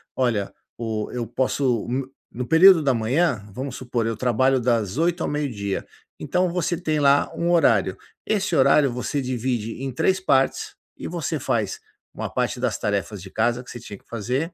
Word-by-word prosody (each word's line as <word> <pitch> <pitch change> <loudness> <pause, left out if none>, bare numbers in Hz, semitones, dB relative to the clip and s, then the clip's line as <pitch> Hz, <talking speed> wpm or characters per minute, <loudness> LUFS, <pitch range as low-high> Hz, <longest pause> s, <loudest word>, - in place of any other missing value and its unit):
"Olha, 115 -6 0 0.2
o 110 -2 -3
eu 120 -1 -2
posso 130 0 0
no 130 +2 -3 0.2
no 125 +1 -5
período 165 +3 +7
da 135 -2 +3
manhã, 125 - +1
vamos 130 +2 -5
supor, 120 -3 -2
eu 115 -1 -2
trabalho 130 +2 +2
das 115 -3 0
8h 170 +1 +1
ao - - -1
meio-dia", 115 -10 -2 0.3
então 180 0 0
você 175 -1 -1
tem 155 -3 -1
lá 140 0 +4
um 170 +1 -1
horário. 115 - +3 0.3
Esse 195 -5 0
horário 140 0 +5
você 125 +4 -2
divide 125 -2 -3
em 135 - -3
3 185 +9 +1
partes 135 -8 +1 0.2
e - - -6
você - - -3
faz - - -1 0.3
uma - - -4
parte - - -1
das - - 0
tarefas 100 -1 -2
de 95 +1 -11
casa 120 +2 0
que 125 - -11
você 120 - -8
tinha 105 -3 -9
que - - -28
fazer, 125 - -2
130 Hz, 180 wpm, -23 LUFS, 115-150 Hz, 0.3 s, período